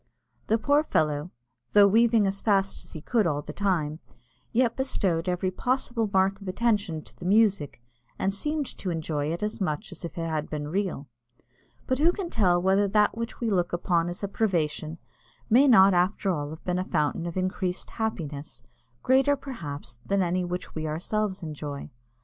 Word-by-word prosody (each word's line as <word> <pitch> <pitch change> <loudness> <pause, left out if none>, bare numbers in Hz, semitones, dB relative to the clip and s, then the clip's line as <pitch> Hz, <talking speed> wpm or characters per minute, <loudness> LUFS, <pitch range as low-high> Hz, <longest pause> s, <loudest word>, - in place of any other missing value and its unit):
The 220 - +3
poor 285 +6 +3
fellow, 150 - 0 0.4
though 205 -1 +8
weaving 225 +1 +4
as 195 0 -1
fast 195 -2 +1
as - - -13
he 155 - -7
could 220 +1 +1
all 145 -2 -1
the - - -7
time, 165 -6 0 0.5
yet 235 0 +2
bestowed 185 -10 0
every 180 +1 0
possible 240 0 0
mark 195 +1 +2
of 195 - -9
attention 200 -5 0
to - - -15
the 175 - -10
music, 200 - +2 0.4
and 195 - 0
seemed 300 +8 -1
to 190 - -3
enjoy 155 -3 -2
it 170 +4 -3
as 210 0 -3
much 155 -1 -2
as 180 - -10
if 170 - -7
it 165 0 -2
had 155 -1 -2
been 150 -1 -4
real. 185 -5 -2 0.8
But 260 0 0
who 330 +3 +5
can 360 -2 -5
tell 180 -5 +3
whether 190 +3 +3
that 210 +2 +3
which 230 0 -5
we 230 -2 -1
look 175 -3 +1
upon 175 -1 +1
as 175 +3 -7
a - - 0
privation 165 -6 -1 0.5
may 265 +5 +6
not 195 -6 +7
after 185 +2 +1
all 150 -2 -3
be 180 - 0
a 180 +1 0
fountain 165 0 -1
of 170 - -5
increased 185 0 -2
happiness, 155 -10 -4 0.4
greater, 270 +2 +4
perhaps, 155 - -7
than 200 -1 +1
any 180 +1 0
which 180 0 -5
we 155 0 -3
ourselves 190 +5 -2
enjoy? 150 -2 -6
185 Hz, 180 wpm, -27 LUFS, 165-215 Hz, 0.8 s, though